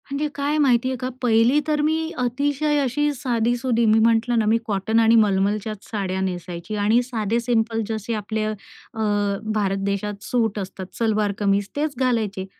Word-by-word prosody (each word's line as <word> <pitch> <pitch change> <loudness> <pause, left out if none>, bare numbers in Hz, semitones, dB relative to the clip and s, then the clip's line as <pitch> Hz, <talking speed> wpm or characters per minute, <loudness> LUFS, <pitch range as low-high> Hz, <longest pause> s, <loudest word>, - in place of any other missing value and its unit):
म्हणजे 280 +2 -1
काय 285 +2 0
माहितीये 260 -3 +2
का 255 0 -3
पहिली 240 +3 +4
तर 300 -1 +1
मी 320 +2 0
अतिशय 285 +4 0
अशी 295 +3 0
साधी-सुधी. 240 -1 0
मी 220 0 +4
म्हंटलं 230 +1 +3
ना 220 - +1
मी 220 +2 +3
कॉटन 215 +1 0
आणि 225 0 +5
मलमलच्याच 210 0 +1
साड्या 190 -3 -2
नेसायची 180 +1 -4
आणि 210 +4 +3
साधे 230 -2 -1
सिंपल 230 -1 0
जसे 220 +1 -3
आपले 215 +1 -3
अ 215 - -1 1.0
भारत 195 -2 0
देशात 200 +1 -3
सूट 225 -4 0
असतात, 190 -1 -6
सलवार 215 -3 +1
कमीज 200 -1 +1
तेच 295 0 -1
घालायचे 220 -7 0
225 Hz, 155 wpm, -22 LUFS, 205-250 Hz, 1.0 s, आणि